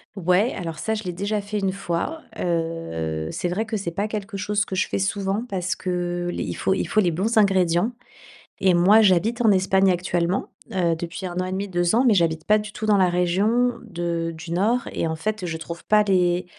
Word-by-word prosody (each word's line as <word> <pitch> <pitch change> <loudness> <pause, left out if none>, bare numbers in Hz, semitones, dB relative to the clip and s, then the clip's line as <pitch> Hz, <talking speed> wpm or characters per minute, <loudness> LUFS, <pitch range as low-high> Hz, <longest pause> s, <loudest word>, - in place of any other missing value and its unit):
Ouais, 190 +5 +2
alors 165 -4 -5
ça, 220 +6 -1
je 215 - -5
l'ai 180 -2 -4
déjà 205 +4 -1
fait 205 +1 -3
une 195 -1 0
fois. 195 - -3 0.2
Heu, 165 - -2
c'est - - -2
vrai 190 +6 -1
que 225 -1 -2
c'est 190 -4 -4
pas 200 +5 -2
quelque 210 -1 -5
chose 205 +1 0
que 190 - -5
je 185 - +1
fais - - -2
souvent 195 +2 -1
parce 185 -4 -2
que 175 -1 -2
les - - -3
il - - -4
faut 190 - +1
il - - -1
faut 215 - +1
les 180 -4 +3
bons 210 +8 -1
ingrédients. 190 0 +3 0.7
Et 190 -2 +4
moi, 190 +6 +6
j'habite 215 +4 +3
en 225 -3 +5
Espagne 190 0 +3
actuellement, 175 0 -1 0.2
heu, 175 -3 +1
depuis 170 +2 -6
1.5, 185 +2 -3
2 175 +1 +1
ans, 250 +3 +3
mais 230 - +6
j'habite 165 -4 +1
pas 215 0 +4
du 210 0 -7
tout 215 - -5
dans 210 -1 +4
la 185 -2 +4
région 195 +8 +2
de 170 -5 -3
du 165 +1 -9
nord. 220 +7 +1
Et, - - -1
en 160 0 -2
fait, 215 +3 -3
je 160 -2 -3
trouve 170 +1 -8
pas 215 0 +4
les 180 -2 +2
185 Hz, 215 wpm, -23 LUFS, 175-210 Hz, 0.7 s, moi